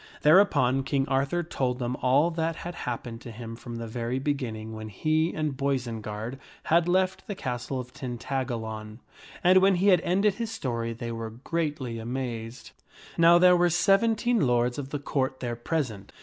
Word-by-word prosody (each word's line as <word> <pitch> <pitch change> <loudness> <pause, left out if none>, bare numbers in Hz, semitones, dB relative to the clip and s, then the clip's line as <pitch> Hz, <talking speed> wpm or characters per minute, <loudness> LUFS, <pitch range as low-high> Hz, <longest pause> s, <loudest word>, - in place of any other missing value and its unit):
Thereupon 150 -6 +5
King 135 0 0
Arthur 135 +6 0
told 130 -6 -1
them 125 0 -2
all 140 +7 +3
that 165 0 -1
had 175 +1 -6
happened 120 -4 -5
to 125 - -9
him 115 0 -7
from 120 0 -8
the 115 0 -5
very 115 +2 -3
beginning 125 -6 -3
when 110 0 -7
he 155 - +1
and 155 -3 -2
Boisenard 120 -3 -3 0.2
had 170 +1 +3
left 185 +1 +1
the 205 - -4
castle 125 -2 -3
of 125 0 -8
Tin 125 -2 -5
tagalon. 110 -5 -4 0.5
And 185 +1 +7
when 195 0 +5
he 190 +3 +3
had 180 -3 +5
ended 195 +4 +2
his 230 +2 -4
story, 120 - -3
they 115 +1 -5
were 115 -1 -4
greatly 135 -1 -3
amazed. 120 0 -5 0.4
Now 170 +1 +7
there 180 0 +6
were 175 0 +3
seventeen 220 +7 +3
lords 120 0 +2
of 135 -1 -5
the 145 - -2
Court 135 -2 -2
there 120 -2 -3
present. 120 -6 -3
130 Hz, 175 wpm, -27 LUFS, 120-165 Hz, 0.5 s, And